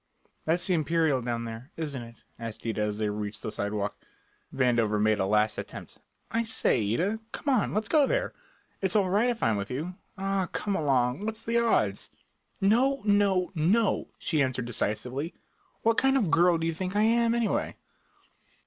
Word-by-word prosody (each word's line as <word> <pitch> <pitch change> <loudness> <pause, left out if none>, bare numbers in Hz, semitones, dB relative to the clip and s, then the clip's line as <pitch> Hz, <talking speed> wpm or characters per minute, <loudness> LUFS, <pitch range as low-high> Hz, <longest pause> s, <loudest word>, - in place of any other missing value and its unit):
"That's 170 +3 +2
the 185 - +2
Imperial 160 -4 +2
down 115 -1 -3
there, 115 +4 -8
isn't 145 -5 -4
it?" 115 -1 -13 0.2
asked 115 -1 -7
Ida 110 -2 -1
as 105 0 -1
they 105 -1 0
reached 105 0 -5
the 110 - -3
sidewalk. 105 0 -2 0.6
Vandover 120 -5 +2
made 110 0 +2
a 95 - +1
last 105 +1 +2
attempt: - - -9 0.3
"I 230 +1 +1
say, 220 - +2
Ida, 205 - 0
come 280 - -1
on, 220 -5 +1
let's 215 0 0
go 295 -3 +4
there. - - 0 0.5
It's 190 0 +1
all 195 -3 +3
right 215 +5 +3
if 235 -2 -2
I'm 110 -2 +2
with 100 +1 -4
you. 155 +8 -4 0.2
Ah, 195 -1 -1
come 205 -2 -2
along; 135 -1 +1
what's 220 0 -4
the 235 +1 +2
odds?" 105 - +1 0.5
"No 250 +7 +3
no 200 -3 +3
NO," 190 +7 +2
she 155 -4 0
answered 130 -2 0
decisively. 125 - -2 0.5
"What 225 0 +3
kind 270 0 +3
of 240 - +2
a - - -2
girl 170 +1 +4
do 165 - -2
you 165 - 0
think 185 +3 -4
I 210 - +3
am, 230 +1 +3
anyway?" 235 -2 0
165 Hz, 185 wpm, -28 LUFS, -, 0.6 s, go